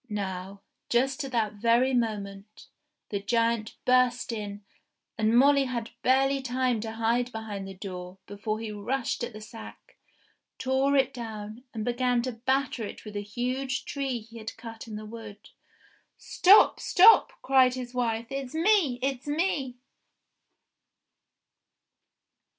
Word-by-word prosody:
Now, 195 Hz, -1 st, -5 dB, 0.3 s
just 265 Hz, +4 st, +1 dB
at 270 Hz, -, -7 dB
that 220 Hz, -3 st, 0 dB
very 235 Hz, +5 st, +2 dB
moment, 210 Hz, -3 st, -3 dB, 0.4 s
the 200 Hz, -, -2 dB
giant 230 Hz, 0 st, 0 dB
burst 250 Hz, -1 st, +3 dB
in, 205 Hz, -2 st, -6 dB, 0.5 s
and 220 Hz, +1 st, +2 dB
Molly 280 Hz, +1 st, +5 dB
had 235 Hz, -3 st, -4 dB
barely 270 Hz, +2 st, +3 dB
time 250 Hz, -2 st, 0 dB
to 220 Hz, 0 st, -5 dB
hide 235 Hz, +2 st, 0 dB
behind 210 Hz, -4 st, -6 dB
the 195 Hz, -, -8 dB
door 180 Hz, -1 st, -7 dB
before 215 Hz, +2 st, -4 dB
he 225 Hz, -1 st, -5 dB
rushed 235 Hz, +5 st, -2 dB
at 240 Hz, -, -3 dB
the 215 Hz, -, -10 dB
sack, 220 Hz, +1 st, -12 dB, 0.6 s
tore 265 Hz, +2 st, +1 dB
it 270 Hz, -2 st, +2 dB
down, 220 Hz, 0 st, -7 dB
and 220 Hz, -2 st, -4 dB
began 245 Hz, 0 st, +1 dB
to 255 Hz, -, -2 dB
batter 260 Hz, +1 st, -1 dB
it 210 Hz, -, -8 dB
with 210 Hz, -1 st, -9 dB
a 205 Hz, -, -2 dB
huge 255 Hz, +6 st, -3 dB
tree 270 Hz, -4 st, -3 dB
he 230 Hz, +1 st, -12 dB
had 220 Hz, 0 st, -7 dB
cut 225 Hz, 0 st, -9 dB
in 215 Hz, -, -7 dB
the 215 Hz, 0 st, -7 dB
wood. 215 Hz, -2 st, -10 dB, 0.7 s
"Stop! 395 Hz, +4 st, +5 dB
stop 420 Hz, +5 st, +6 dB
!" -, -, -43 dB
cried 260 Hz, -2 st, +4 dB
his 250 Hz, -1 st, -6 dB
wife. 230 Hz, -2 st, -1 dB
"It's 270 Hz, 0 st, -5 dB
me! 330 Hz, -, +3 dB
It's 270 Hz, 0 st, -2 dB
me 290 Hz, -5 st, -1 dB
235 Hz, 145 wpm, -27 LUFS, 215-260 Hz, 0.7 s, stop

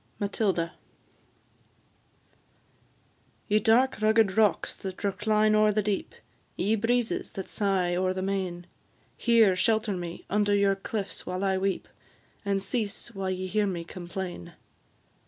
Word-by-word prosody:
MATILDA. 195 Hz, -4 st, 0 dB, 2.8 s
Ye 210 Hz, +1 st, +3 dB
dark 230 Hz, +3 st, +3 dB
rugged 215 Hz, -2 st, +3 dB
rocks, 215 Hz, -2 st, +2 dB
that 190 Hz, 0 st, -7 dB
recline 210 Hz, +2 st, +2 dB
o'er 215 Hz, 0 st, +5 dB
the 210 Hz, 0 st, 0 dB
deep, 200 Hz, -1 st, -2 dB, 0.4 s
Ye 210 Hz, +4 st, +1 dB
breezes, 230 Hz, +2 st, 0 dB
that 190 Hz, -, -5 dB
sigh 190 Hz, -4 st, 0 dB
o'er 185 Hz, +1 st, +1 dB
the 185 Hz, 0 st, -3 dB
main, 185 Hz, -3 st, -2 dB, 0.5 s
Here 225 Hz, -5 st, +4 dB
shelter 215 Hz, 0 st, +1 dB
me 175 Hz, -1 st, -6 dB
under 205 Hz, 0 st, +2 dB
your 200 Hz, -1 st, +3 dB
cliffs 200 Hz, +1 st, -5 dB
while 185 Hz, +1 st, -3 dB
I 190 Hz, -1 st, +1 dB
weep, 195 Hz, 0 st, -1 dB, 0.6 s
And 200 Hz, -2 st, 0 dB
cease 215 Hz, +1 st, -2 dB
while 195 Hz, -2 st, -3 dB
ye 185 Hz, 0 st, -2 dB
hear 205 Hz, +3 st, +1 dB
me 175 Hz, -3 st, -3 dB
complain. 175 Hz, -, -7 dB
200 Hz, 130 wpm, -28 LUFS, 185-215 Hz, 2.8 s, o'er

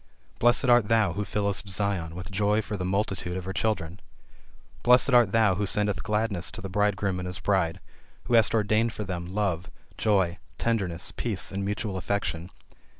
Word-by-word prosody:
Blessed 120 Hz, +3 st, +3 dB
art 120 Hz, -4 st, +5 dB
thou, 110 Hz, -1 st, +2 dB
who 105 Hz, -, -2 dB
fillest 100 Hz, -1 st, -2 dB
Zion 95 Hz, -4 st, -1 dB
with 90 Hz, +2 st, -7 dB
joy 105 Hz, +2 st, +1 dB
for 105 Hz, -, -5 dB
the 95 Hz, -, -4 dB
multitude 95 Hz, -1 st, -2 dB
of 90 Hz, -, -6 dB
her 95 Hz, -, -4 dB
children! 95 Hz, -4 st, -2 dB, 0.8 s
Blessed 125 Hz, +3 st, +5 dB
art 120 Hz, -5 st, +5 dB
thou 110 Hz, -3 st, +4 dB
who 100 Hz, +2 st, -1 dB
sendest 105 Hz, 0 st, 0 dB
gladness 105 Hz, -4 st, 0 dB
to -, -, -5 dB
the 95 Hz, -, -6 dB
bridegroom 100 Hz, -1 st, 0 dB
and 90 Hz, -, -4 dB
his 90 Hz, +1 st, -2 dB
bride; 95 Hz, -5 st, 0 dB, 0.4 s
who 120 Hz, -, -3 dB
hast 115 Hz, 0 st, +5 dB
ordained 110 Hz, +1 st, +1 dB
for 105 Hz, -, -4 dB
them, 90 Hz, -3 st, -5 dB
love, 95 Hz, -2 st, -2 dB, 0.3 s
joy, 95 Hz, -5 st, +1 dB, 0.2 s
tenderness, 95 Hz, -8 st, -1 dB
peace 110 Hz, -6 st, -1 dB
and 100 Hz, 0 st, -3 dB
mutual 105 Hz, 0 st, -3 dB
affection. 90 Hz, -3 st, -2 dB
100 Hz, 175 wpm, -27 LUFS, 95-110 Hz, 0.8 s, art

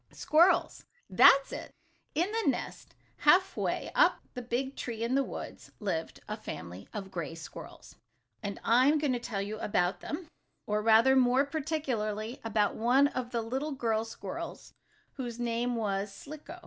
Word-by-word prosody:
Squirrels! 335 Hz, +5 st, +3 dB, 0.3 s
That's 275 Hz, 0 st, +7 dB
it! -, -, -7 dB, 0.4 s
In 350 Hz, +6 st, +1 dB
the 450 Hz, 0 st, +1 dB
nest, -, -, -4 dB, 0.2 s
half 375 Hz, +1 st, +4 dB
way -, -, -2 dB
up -, -, +4 dB
the 250 Hz, -, -5 dB
big 250 Hz, +3 st, -2 dB
tree 230 Hz, -2 st, -4 dB
in 235 Hz, +2 st, 0 dB
the 275 Hz, +1 st, +3 dB
woods, -, -, -8 dB
lived 175 Hz, -6 st, -3 dB
a -, -, -3 dB
family 85 Hz, +4 st, -8 dB
of 195 Hz, -2 st, -6 dB
gray 170 Hz, -3 st, -4 dB
squirrels, 165 Hz, -, -11 dB, 0.4 s
and 200 Hz, -2 st, -5 dB
I 245 Hz, +3 st, +5 dB
am 305 Hz, +2 st, +4 dB
going 290 Hz, -3 st, +1 dB
to 245 Hz, -, -1 dB
tell 205 Hz, -4 st, -3 dB
you 215 Hz, +2 st, -5 dB
about 180 Hz, -4 st, 0 dB
them, 320 Hz, +4 st, -5 dB, 0.4 s
or, 210 Hz, 0 st, 0 dB
rather, 225 Hz, +4 st, +5 dB
more 260 Hz, +1 st, +4 dB
particularly, 260 Hz, -7 st, -3 dB
about 215 Hz, -2 st, +1 dB
one 260 Hz, +5 st, +3 dB
of 255 Hz, -3 st, -4 dB
the 235 Hz, -2 st, -2 dB
little 265 Hz, +6 st, -3 dB
girl 225 Hz, -4 st, 0 dB
squirrels 225 Hz, -, -7 dB, 0.4 s
whose 240 Hz, -3 st, -5 dB
name 240 Hz, +1 st, -1 dB
was 200 Hz, -2 st, -1 dB
Slicko. 295 Hz, +9 st, -10 dB
235 Hz, 160 wpm, -30 LUFS, 210-275 Hz, 0.4 s, That's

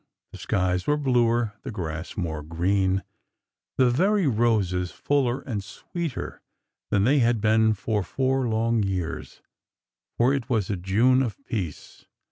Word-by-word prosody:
The -, -, -10 dB
skies 90 Hz, -1 st, 0 dB
were 150 Hz, -, +3 dB
bluer, 120 Hz, -5 st, +2 dB
the -, -, -6 dB
grass 80 Hz, -5 st, -5 dB
more 80 Hz, -5 st, -2 dB
green, 95 Hz, +4 st, 0 dB, 0.7 s
the 125 Hz, -2 st, +4 dB
very 190 Hz, +8 st, +2 dB
roses 105 Hz, -8 st, +1 dB
fuller 135 Hz, 0 st, 0 dB
and 105 Hz, -6 st, -4 dB
sweeter 160 Hz, -, -6 dB, 0.5 s
than 100 Hz, -1 st, +2 dB
they 140 Hz, +6 st, +4 dB
had 120 Hz, -2 st, +3 dB
been 110 Hz, +1 st, +3 dB
for 105 Hz, +2 st, -1 dB
four 130 Hz, +6 st, 0 dB
long 115 Hz, 0 st, +1 dB
years,— 95 Hz, -4 st, -4 dB, 0.7 s
for 125 Hz, +3 st, +4 dB
it 135 Hz, -4 st, -3 dB
was 110 Hz, -5 st, 0 dB
a -, -, 0 dB
June 110 Hz, +9 st, +3 dB
of 120 Hz, -5 st, -2 dB
peace. 95 Hz, -, -5 dB
110 Hz, 140 wpm, -25 LUFS, 95-125 Hz, 0.7 s, the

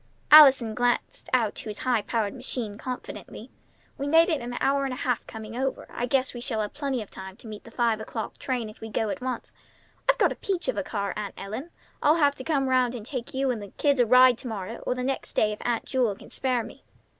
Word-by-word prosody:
Allison 270 Hz, -7 st, +9 dB
glanced 245 Hz, +2 st, -1 dB
out 230 Hz, -5 st, +2 dB
to -, -, -7 dB
his 210 Hz, -, -5 dB
high 245 Hz, -2 st, +1 dB
powered 215 Hz, -1 st, -1 dB
machine 245 Hz, -4 st, -4 dB
confidently. 250 Hz, +3 st, -7 dB, 0.5 s
"We 280 Hz, -, -2 dB
made 325 Hz, +4 st, +5 dB
it 315 Hz, -4 st, 0 dB
in 240 Hz, +1 st, -5 dB
an 245 Hz, -, -5 dB
hour 275 Hz, +1 st, +2 dB
and 270 Hz, -, -1 dB
a -, -, -9 dB
half 250 Hz, -4 st, -1 dB
coming 220 Hz, 0 st, -8 dB
over. 265 Hz, +2 st, -2 dB
I 245 Hz, -, -2 dB
guess 260 Hz, +1 st, +1 dB
we 240 Hz, -, -7 dB
shall 240 Hz, -4 st, -1 dB
have 210 Hz, -, -4 dB
plenty 275 Hz, -5 st, -2 dB
of 205 Hz, -, -18 dB
time 190 Hz, +1 st, -9 dB
to -, -, -16 dB
meet 215 Hz, -2 st, -9 dB
the -, -, -10 dB
five 230 Hz, -2 st, +1 dB
o'clock 220 Hz, 0 st, -6 dB
train 250 Hz, -4 st, -2 dB
if 215 Hz, -, -13 dB
we 225 Hz, -, -6 dB
go 220 Hz, 0 st, -1 dB
at 280 Hz, -, -4 dB
once. 255 Hz, -2 st, -4 dB, 0.6 s
I've -, -, +5 dB
got -, -, +3 dB
a -, -, -3 dB
peach 375 Hz, -3 st, -2 dB
of -, -, 0 dB
a -, -, 0 dB
car, 200 Hz, -3 st, -3 dB
Aunt 210 Hz, -2 st, -5 dB
Ellen. 220 Hz, +11 st, -6 dB, 0.3 s
I'll 300 Hz, +2 st, +5 dB
have 290 Hz, -4 st, +4 dB
to 260 Hz, -, -7 dB
come 275 Hz, -3 st, +1 dB
round 255 Hz, -1 st, +2 dB
and 220 Hz, -3 st, -7 dB
take 255 Hz, -1 st, -5 dB
you 265 Hz, 0 st, +1 dB
and 230 Hz, -4 st, -3 dB
the 205 Hz, -, -7 dB
kids 285 Hz, -3 st, +2 dB
a 245 Hz, -, +4 dB
ride 250 Hz, 0 st, +7 dB
to 255 Hz, -, -6 dB
morrow 220 Hz, 0 st, -5 dB
or 250 Hz, -, +1 dB
the 250 Hz, -, -3 dB
next 270 Hz, +1 st, -3 dB
day 215 Hz, -, +2 dB
if 210 Hz, -, -6 dB
Aunt 235 Hz, -2 st, -1 dB
Jewel 245 Hz, -6 st, +1 dB
can -, -, -15 dB
spare 255 Hz, -3 st, 0 dB
me." -, -, -12 dB
245 Hz, 255 wpm, -26 LUFS, 220-270 Hz, 0.6 s, Allison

